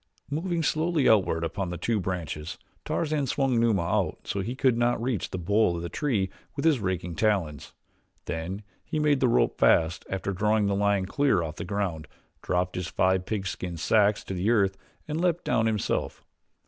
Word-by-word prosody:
Moving 165 +2 -1
slowly 160 -1 +1
outward 95 -6 +3
upon 85 +3 -3
the 90 - -4
two 110 +5 0
branches 85 -4 -4 0.3
Tarzan 155 -4 -1
swung 130 -2 +1
Numa 110 -6 +2
out 100 +2 -1
so 100 - -3
that 95 - -3
he 120 - -3
could 130 -3 +3
not 120 +1 +1
reach 115 -5 -2
the - - -4
bole 100 +1 +2
of 85 - -4
the 85 - -4
tree 105 - -1 0.2
with 140 - -3
his 155 -6 +4
raking 90 -3 -2
talons, 85 -6 -1 0.5
then 90 +6 -4 0.2
he - - -4
made 150 -2 +3
the 130 - +3
rope 120 - +2
fast 80 +1 +3
after 95 +1 -2
drawing 105 +2 +2
the 100 - +1
lion 100 -1 +1
clear 115 -3 +2
of 80 -2 -6
the - - -4
ground, 90 -5 -3 0.3
dropped 90 0 -1
his 90 -1 -3
five 95 0 +1
pigskin 95 -4 -3
sacks 105 +4 +3
to 95 +2 -2
earth 100 -5 +3 0.3
and 155 +2 -2
leaped 175 -1 +1
down 115 -2 +2
himself. 110 -3 -1
100 Hz, 185 wpm, -27 LUFS, 90-120 Hz, 0.5 s, his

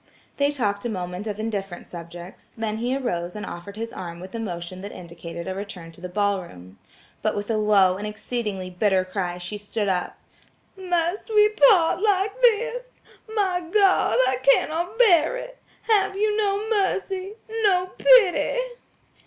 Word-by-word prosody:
They 280 0 +3
talked 210 -8 -1
a 240 - -2
moment 180 0 -5
of 210 0 -4
indifferent 200 -5 -4
subjects, 170 +1 -11
then 220 -1 -2
he 245 +4 -1
arose 180 -9 -3
and 210 - -5
offered 175 +4 -8
his 230 +1 -5
arm 170 -2 -7
with 185 +1 -10
a 230 - -4
motion 185 -3 -5
that 200 - -7
indicated 170 0 -8
a 190 - -2
return 185 -4 -7
to 165 - -17
the 180 - -6
ball 200 0 0
room. 95 - -13 0.4
But 215 - 0
with 205 +2 -3
a 220 - +1
low 200 -3 +4
and 210 +2 -4
exceedingly 210 -3 -4
bitter 190 0 +1
cry 185 -2 -3
she 180 +4 -6
stood 205 0 -3
up. 185 -2 -1 0.6
"Must 355 +1 -1
we 425 -1 +5
part 425 -6 +4
like 400 -1 +2
this? 485 +1 +2 0.5
My 375 -4 +1
God! 390 - +4
I 260 0 +1
cannot 325 +8 +2
bear 385 -3 +5
it! - - -9 0.2
Have 420 -3 +2
you 420 +1 +1
no 415 0 0
mercy, 390 -2 -1 0.3
no 370 -3 +2
pity?" - - +5
220 Hz, 165 wpm, -24 LUFS, -, 0.6 s, we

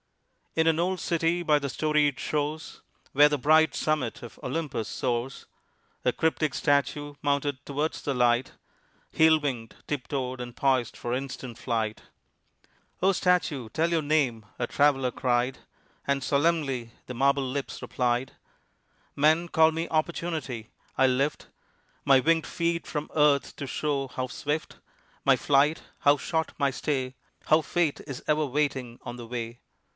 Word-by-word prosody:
In 160 - +3
an 160 0 +3
old 185 +2 0
city 170 +1 0
by 150 -3 +4
the 140 -1 -3
storied 150 -1 +1
shores 150 +1 -3 0.3
Where 145 +2 +7
the 150 - 0
bright 155 +3 +4
summit 150 -7 -1
of 120 - -11
Olympus 135 -5 -3
soars, 125 +1 -2 0.6
A - - +3
cryptic 155 -3 0
statue 145 +1 +1
mounted 140 -1 0
towards 145 +3 -2
the 140 - -2
light 120 +1 +2 0.6
Heel 160 0 +5
winged, 125 -6 -4
tip 145 -4 -3
toed, 130 -2 -3
and 120 0 -7
poised 130 -4 +1
for 120 - -3
instant 130 -2 -5
flight. 110 -3 -2 1.0
"O 190 - +5
statue, 175 - +1
tell 165 +8 0
your 165 -1 +2
name," 145 -7 +1
a 120 - 0
traveler 135 -3 +2
cried, 125 +1 0 0.5
And 140 0 +1
solemnly 140 -6 +1
the 125 - -6
marble 135 +2 +2
lips 140 +1 -4
replied: 125 0 -1 0.8
"Men 155 +4 +3
call 160 0 +5
me 165 +1 -3
Opportunity: 155 -7 -2 0.3
I 135 - +5
lift 135 +3 0 0.6
My 135 -2 +6
winged 160 +3 +2
feet 170 0 -1
from 150 -1 -4
earth 150 -2 +3
to 140 - -6
show 140 0 -1
how 130 0 -4
swift 150 +4 -3 0.5
My - - +5
flight, 145 +3 +2 0.2
how 145 0 +5
short 160 +3 -2
my 140 -1 +2
stay 130 -1 -2 0.3
How 155 +1 +5
Fate 165 -2 0
is 135 -4 -6
ever 150 0 +2
waiting 135 -4 -2
on 120 -1 -6
the 120 -1 -9
way." 120 0 -5
140 Hz, 150 wpm, -27 LUFS, 130-155 Hz, 1.0 s, Where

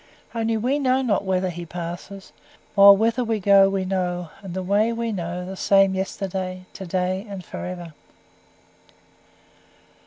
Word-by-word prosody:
Only 225 -1 0
we 255 +6 0
know 260 -1 +2
not 205 -5 0
whither 185 -1 0
he 175 0 -7
passes; 175 +3 -8 0.4
while 200 -1 +8
whither 230 +4 +1
we 225 -2 -1
go 195 0 +6
we 195 -1 -1
know, 180 -3 -2
and 190 -3 -8
the 190 - -3
Way 205 +5 +2
we 230 0 -2
know 180 -2 -4
the 190 +1 -6
same 195 0 +4
yesterday, 190 -1 -4
to 190 - -8
day, 185 +2 -1
and 195 -3 -7
for - - -7
ever." 175 -3 -7
190 Hz, 155 wpm, -23 LUFS, 180-210 Hz, 0.4 s, while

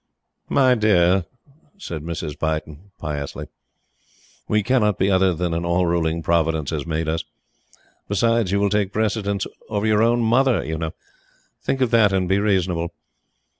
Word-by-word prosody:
"My 130 -2 +4
dear," 95 -5 +3 0.5
said 85 - -6
Mrs. 80 -2 -5
Beighton, 80 +3 -3
piously, 75 0 -5 1.0
"we 105 -1 +1
cannot 105 -4 +2
be 95 +2 +2
other 95 0 +3
than 85 0 -2
an 85 +1 -2
all 85 +1 +1
ruling 85 -1 0
Providence 80 -3 +1
has 75 -2 -3
made 80 0 -2
us. 80 +1 -1 0.8
Besides, 115 0 +1
you 100 - +2
will 100 -1 +1
take 105 -2 +1
precedence 105 -2 -1 0.2
of 105 -1 -1
your 110 -1 +3
own 120 +1 +3
Mother, 120 - +2
you 80 +1 -3
know! 80 -1 -4 0.7
Think 135 - -2
of 125 -3 +2
that 110 -4 +5
and 95 -1 0
be 95 +2 +2
reasonable." 90 -5 0
95 Hz, 155 wpm, -22 LUFS, 80-105 Hz, 1.0 s, that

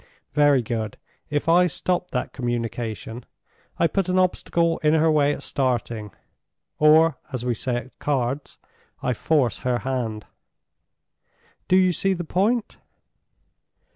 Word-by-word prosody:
Very 145 -3 +4
good. 110 -2 -3 0.3
If 145 +2 -1
I 175 +2 +5
stop 180 +2 -1
that 125 - -3
communication, 120 -1 -4 0.5
I - - +3
put 190 +2 0
an 185 - +1
obstacle 170 -2 +1
in 150 +1 +3
her 160 0 +4
way 145 -2 +3
at - - -5
starting—or, 120 -5 -1 1.2
as 125 -2 -4
we 125 - +1
say 120 +2 -2
at 120 +2 -7
cards, 135 0 -2 0.5
I 125 - +1
force 130 0 +1
her 125 -1 0
hand. 120 -5 -3 1.4
Do 185 - +3
you 185 -1 +4
see 195 +4 +1
the 175 - -4
point?" 210 +8 0
140 Hz, 130 wpm, -24 LUFS, 120-170 Hz, 1.4 s, I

